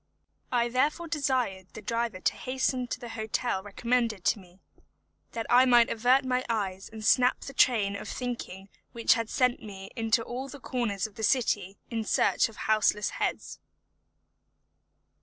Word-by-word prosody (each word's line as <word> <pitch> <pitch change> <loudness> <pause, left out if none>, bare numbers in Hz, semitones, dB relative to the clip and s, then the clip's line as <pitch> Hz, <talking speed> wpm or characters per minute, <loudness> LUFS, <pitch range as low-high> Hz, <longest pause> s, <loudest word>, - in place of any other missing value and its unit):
I 240 -1 +2
therefore 290 +7 0
desired 260 - -1
the 215 - -8
driver 230 -2 -2
to - - +1
hasten 255 -1 -1
to 250 - -4
the 240 -2 -8
hotel 220 -2 -2
recommended 225 0 -1
to - - +2
me, 180 -1 -18 0.7
that 225 -1 -3
I 250 +1 +6
might 240 -2 +5
avert 250 +4 +3
my 255 0 0
eyes 195 -4 -2
and 220 -1 -7
snap 250 +2 +4
the 275 - -8
train 215 -7 +3
of - - -6
thinking 220 -6 -5 0.2
which 230 -1 +4
had 230 -1 -2
sent 250 -1 +1
me 195 -2 -9
into 225 0 +1
all 255 +4 -5
the 285 - -9
corners 235 -7 -2
of 215 -2 -9
the 220 - -5
city 205 -5 +1
in 225 -1 -1
search 215 - +2
of 220 - -14
houseless 215 -1 +2
heads. - - -3
230 Hz, 160 wpm, -28 LUFS, 210-250 Hz, 0.7 s, I